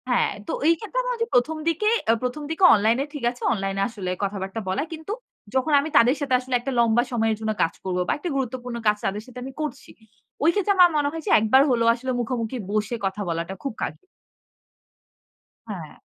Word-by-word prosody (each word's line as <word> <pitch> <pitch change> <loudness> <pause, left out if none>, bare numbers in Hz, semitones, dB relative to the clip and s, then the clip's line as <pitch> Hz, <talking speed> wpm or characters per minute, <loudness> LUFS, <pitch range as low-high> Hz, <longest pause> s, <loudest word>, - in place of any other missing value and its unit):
হ্যাঁ, 245 - +2 0.2
তো - - -2 0.2
এই 335 - +7
ক্ষেত্রে - - -3
আমার - - -1
ওইযে 460 0 -1
১ম, 305 +6 +2
দিকে 335 +6 +2 0.2
অ্যা 225 - +5
১ম, 250 +4 -2
দিকে 320 +4 -2
অনলাইন 220 +2 +3
এ - - -5
ঠিক 290 -4 -6
আছে। 245 - -16
অনলাইন 195 -2 -2
এ - - +1
আসলে 200 -5 -5
কথাবার্তা 195 +1 -3
বলা। 190 +7 0
কিন্তু 320 +4 -7 0.4
যখন 265 +4 +1
আমি 295 +3 -2
তাদের 245 +4 +5
সাথে 280 -2 -1
আসলে 255 0 -7
একটা 270 +3 -4
লম্বা 235 0 +4
সময়ের 225 -2 +1
জন্য 220 0 -1
কাজ 165 - +2
করব 185 -1 -2
বা - - +1
একটা 345 +4 -4
গুরুত্বপূর্ণ 250 -2 -3
কাজ 210 0 +4
তাদের 205 +2 -2
সাথে 250 -1 -10
আমি 265 +1 -7
করছি। 300 -3 -5 0.5
ওই 320 - +6
ক্ষেত্রে 405 +1 +2
আমার 360 -1 +8
মনে 290 -1 +2
হয় 325 0 -6
যে - - 0
একবার 220 +5 +5
হলেও 230 -2 +2
আসলে 255 +2 -4
মুখোমুখি 240 0 -2
বসে 215 +2 0
কথা 195 +2 -2
বলাটা 170 +2 -3
খুব 275 - -3
কা - - +1 1.8
হ্যাঁ। - - -8
245 Hz, 210 wpm, -24 LUFS, 215-290 Hz, 1.8 s, আমার